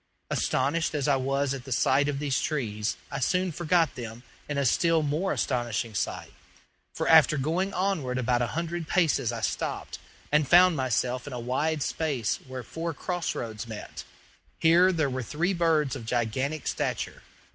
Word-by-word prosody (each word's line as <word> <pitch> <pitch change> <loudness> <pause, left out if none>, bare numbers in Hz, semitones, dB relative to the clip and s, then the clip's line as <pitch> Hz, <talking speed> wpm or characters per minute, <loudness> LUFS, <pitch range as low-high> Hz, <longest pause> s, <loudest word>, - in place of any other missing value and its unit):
Astonished 155 +5 0
as 145 -2 0
I 140 - +4
was 135 +1 0
at 135 -2 -6
the 135 - -10
sight 135 +4 +3
of 140 - -2
these 140 -2 0
trees, 110 -8 -2
I 140 - -3
soon 180 +7 +1
forgot 165 -1 +1
them 115 -1 -8 0.3
in 145 - -2
a 140 - +1
still 165 +5 +3
more 155 +6 0
astonishing 120 -3 -1
sight, 95 - -3 0.6
for - - -3
after 155 -1 +6
going 165 +8 0
onward 180 -11 -1
about 125 -1 +1
a 120 - +1
hundred 170 -1 -3
paces 160 - +2
I 115 -1 -5
stopped, 90 -6 -3 0.3
and 150 -1 +3
found 180 +2 +6
myself 130 -1 -1
in 145 - -6
a 125 - -4
wide 140 +5 -1
space 140 -9 -1
where 130 -1 -6
four 165 +6 -5
cross 175 -1 -2
roads 110 -1 -5
met. 110 -2 -8 0.5
Here 175 +3 +5
there 160 -5 +1
were 130 -1 -3
three 165 - -1
birds 160 -5 +2
of 115 - -8
gigantic 130 +6 -1
stature. - - -2
140 Hz, 170 wpm, -27 LUFS, 125-165 Hz, 0.6 s, after